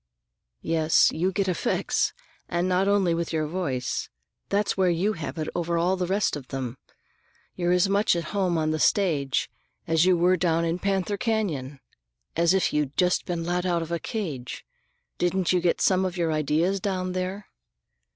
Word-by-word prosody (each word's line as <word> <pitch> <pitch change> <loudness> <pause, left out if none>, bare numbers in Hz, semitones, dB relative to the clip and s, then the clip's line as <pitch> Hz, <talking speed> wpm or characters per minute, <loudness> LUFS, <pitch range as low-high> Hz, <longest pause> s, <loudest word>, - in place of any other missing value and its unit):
"Yes, 160 -1 +3
you 180 +4 0
get 195 0 -1
effects, 180 -3 0 0.4
and 175 +1 0
not 185 +1 +2
only 200 -4 +3
with 170 0 -2
your 155 -1 0
voice. 145 -7 -3 0.4
That's 200 +1 +1
where 190 -2 +3
you 180 +5 +1
have 160 -1 -6
it 155 -1 -3
over 170 0 -1
all 175 +3 +2
the 180 -1 -2
rest 195 -1 +1
of 140 -3 -8
them; 130 -2 -5 0.8
you're 175 -1 0
as 180 +2 +4
much 200 -1 +2
at 170 - -1
home 185 -4 +1
on 155 -1 0
the 155 - -1
stage 150 -9 +1 0.4
as 165 0 +3
you 185 -1 +4
were 180 +2 +3
down 170 -1 +1
in 165 +2 -1
Panther 195 +1 -1
Canyon—as 155 - -3
if 190 - +1
you'd 150 -2 -1
just 180 0 +2
been 170 -2 -2
let 175 +1 -1
out 175 -2 0
of 165 - -8
a 170 - -1
cage. 155 - -5 0.5
Didn't 180 +1 +1
you 180 - +2
get 175 -1 +1
some 190 -1 +3
of 185 -1 -3
your 165 -2 0
ideas 155 +6 +1
down 185 -1 -2
there?" 185 +2 -3
175 Hz, 180 wpm, -26 LUFS, 160-185 Hz, 0.8 s, as